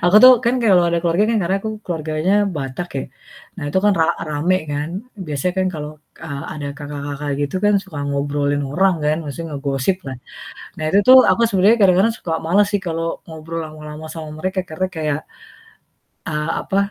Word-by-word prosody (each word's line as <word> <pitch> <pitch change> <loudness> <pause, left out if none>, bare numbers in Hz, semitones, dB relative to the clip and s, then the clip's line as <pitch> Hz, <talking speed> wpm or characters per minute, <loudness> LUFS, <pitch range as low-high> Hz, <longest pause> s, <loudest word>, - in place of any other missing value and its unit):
Aku 180 +4 +5
tuh 255 0 +11
kan 235 - +3
kalau 190 -5 +5
ada 170 0 +1
keluarga 175 +4 +2
kan, 230 - +2
karena 185 +3 +1
aku 220 - -4 0.2
keluarganya 160 +1 -1 0.2
Batak 140 +4 -4
ya. - - -2 0.6
Nah, - - -5
itu 150 - +1
kan 210 - +5
ra 160 - +4 0.2
rame 155 +5 +1
kan, 145 +2 -2 0.4
biasanya 150 +4 -1
kan 185 - +2
kalau, 150 -1 -5 0.3
eee, 140 -3 -5
ada 150 -2 -5
kakak-kakak 145 0 -5
gitu 145 +4 -2
kan 205 0 +4
suka 170 -7 -8
ngobrolin 145 0 0
orang 190 +5 +3
kan, 150 +1 +2
maksudnya 155 +2 -6
ngegosip 140 +5 0
lah. 135 -1 -5 0.6
Nah, - - -6
itu 195 - +3
tuh 260 - +11
aku - - +2
sebenarnya 205 +2 +4
kadang-kadang 195 +3 +4
suka 165 - -4
males 200 +5 +3
sih 205 - +1
kalau 165 0 -2 0.2
ngobrol 160 0 -7
lama-lama 155 0 -9
sama 160 -2 -7
mereka 185 +3 -1
karena 160 +4 -2
kayak, 150 -2 -1 1.1
eee, 150 0 -2
apa, 195 - -2
160 Hz, 180 wpm, -20 LUFS, 145-185 Hz, 1.1 s, tuh